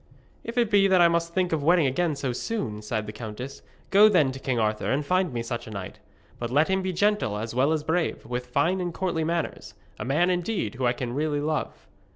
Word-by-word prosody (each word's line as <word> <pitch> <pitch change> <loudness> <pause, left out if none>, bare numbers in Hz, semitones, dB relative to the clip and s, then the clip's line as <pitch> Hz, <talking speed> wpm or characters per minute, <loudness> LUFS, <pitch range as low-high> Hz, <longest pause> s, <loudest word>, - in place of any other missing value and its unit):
'If 230 +2 -7
it 235 -3 +2
be 200 -1 +5
that 190 -1 +4
I 175 - +7
must 170 0 0
think 180 -1 0
of 155 - 0
wedding 165 +1 +4
again 155 +4 0
so 135 -3 -2
soon,' 120 - -3
sighed 110 0 -3
the 105 - -6
countess, 115 +4 -7 0.3
'go 210 +2 +7
then 155 -10 +3
to 135 - -8
King 130 -2 -1
Arthur, 110 -1 0
and 140 +2 0
find 185 +1 +1
me 120 -1 -3
such 120 -1 -5
a - - -7
knight. 100 -3 -7 0.4
But 120 - -3
let 145 +7 +3
him 190 0 +1
be 185 0 -2
gentle 205 - +1
as 110 +2 -4
well 130 +5 +2
as 155 -2 0
brave, 160 +2 -1
with 125 0 -4
fine 180 +9 +1
and 175 -2 -3
courtly 175 -4 -1
manners 170 +1 -3 0.2
a - - -3
man, 165 +8 +2
indeed, 175 - -1
whom 125 0 -1
I 120 - +2
can 120 -1 -4
really 145 +1 0
love.' 150 +1 -3
155 Hz, 235 wpm, -26 LUFS, 125-180 Hz, 0.4 s, I